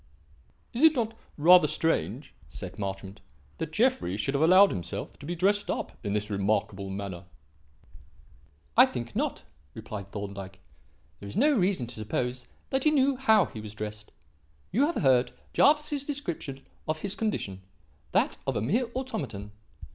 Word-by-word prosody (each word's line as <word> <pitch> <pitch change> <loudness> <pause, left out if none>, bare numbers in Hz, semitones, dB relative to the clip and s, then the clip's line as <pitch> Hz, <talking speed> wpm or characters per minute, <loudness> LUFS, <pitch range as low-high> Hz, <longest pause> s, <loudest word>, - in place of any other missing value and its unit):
"Is 245 - -1
it 320 -1 +7
not 225 -2 -1 0.2
rather 175 +4 +7
strange," 135 - -1 0.2
said - - -8
Marchmont, 95 0 -5 0.4
"that - - -3
Jeffrey 90 +3 +1
should 105 +6 0
have 140 - +1
allowed 185 +5 +7
himself 95 +2 -5
to 145 - -9
be 175 - -2
dressed 200 +4 +2
up - - -2
in 100 -2 -2
this 105 0 -2
remarkable 100 -1 0
manner?" 95 -2 -5 1.5
"I - - +8
think - - -6
not," - - -1 0.3
replied 105 -3 -7
Thorndyke. 100 -2 -7 0.6
"There 100 - -8
is - - -6
no 295 +5 +5
reason 185 - +1
to 120 - -9
suppose 125 +4 -3 0.2
that 265 -1 +1
he 305 - +5
knew 280 -2 +3
how 220 -7 +4
he 110 - -8
was 105 0 -9
dressed. 105 -1 -6 0.6
You 270 +8 +3
have 340 - -2
heard 130 -2 +4 0.2
Jervis's 295 -1 +3
description 175 - -5 0.2
of 155 0 -2
his 200 0 -2
condition; 195 - -2 0.5
that - - +1
of - - 0
a - - 0
mere 230 - +1
automaton. 220 - -4
135 Hz, 155 wpm, -28 LUFS, -, 1.5 s, I